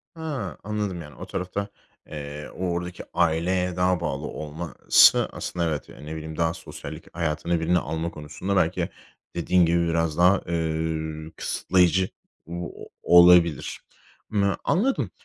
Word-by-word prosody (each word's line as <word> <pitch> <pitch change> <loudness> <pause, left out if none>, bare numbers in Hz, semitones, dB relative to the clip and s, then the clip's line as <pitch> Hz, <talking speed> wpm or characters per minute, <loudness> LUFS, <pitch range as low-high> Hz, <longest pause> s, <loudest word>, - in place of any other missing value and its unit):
Ha, 160 -4 -4
anladım. 105 -4 -3
Yani, 75 -3 -11
o - - -8
tarafta, 100 +3 -3 0.4
eee, 75 0 -7
o 90 0 -2
oradaki 90 +1 -4
aileye 90 +2 +1
daha 90 -1 +2
bağlı 75 -3 -3
olması 80 +2 +3
aslında 85 -1 -2
evet, 75 -3 -3
yani, 75 - -12
ne 80 - -5
bileyim, 80 0 -7
daha 80 -1 +1
sosyallik - - -10
hayatına 85 +1 0
birini 85 +2 +2
alma 80 +2 -3
konusunda 75 +6 -4
belki 85 -3 +1 0.5
dediğin 85 +1 +3
gibi 85 0 +2
biraz 80 -1 0
daha, 90 +2 +5
eee, 80 -1 -2
kısıtlayıcı 90 0 +2 0.4
o 85 0 -5 0.3
olabilir. 85 -3 +6 0.5
Imm, 100 -2 +2
anladım. 250 +10 +1
85 Hz, 135 wpm, -25 LUFS, 80-90 Hz, 0.5 s, olabilir